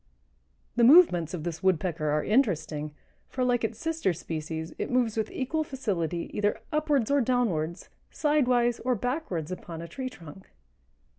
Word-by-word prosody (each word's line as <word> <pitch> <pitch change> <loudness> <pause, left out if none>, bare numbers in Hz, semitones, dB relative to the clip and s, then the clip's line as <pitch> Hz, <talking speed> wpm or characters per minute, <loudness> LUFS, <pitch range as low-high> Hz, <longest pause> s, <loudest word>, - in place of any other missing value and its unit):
The 240 - +4
movements 235 - +6
of 160 - -6
this 170 0 -4
Woodpecker 175 -4 +1
are 150 +1 +1
interesting, 160 - 0 0.4
for, 255 - -2
like 245 -2 +1
its 225 - -2
sister 325 - 0
species, 160 0 -5
it - - -2
moves 245 -3 +1
with 220 -1 -1
equal 310 +5 -2
facility 185 - -3
either 205 0 0
upwards 295 -5 +1
or 285 -1 +4
downwards, 205 -10 0 0.2
sidewise 250 -6 +2
or 250 0 0
backwards 220 - -3
upon 175 -2 -7
a 170 - -6
tree 255 +10 -5
trunk. 170 -4 -13
210 Hz, 150 wpm, -28 LUFS, 165-255 Hz, 0.4 s, movements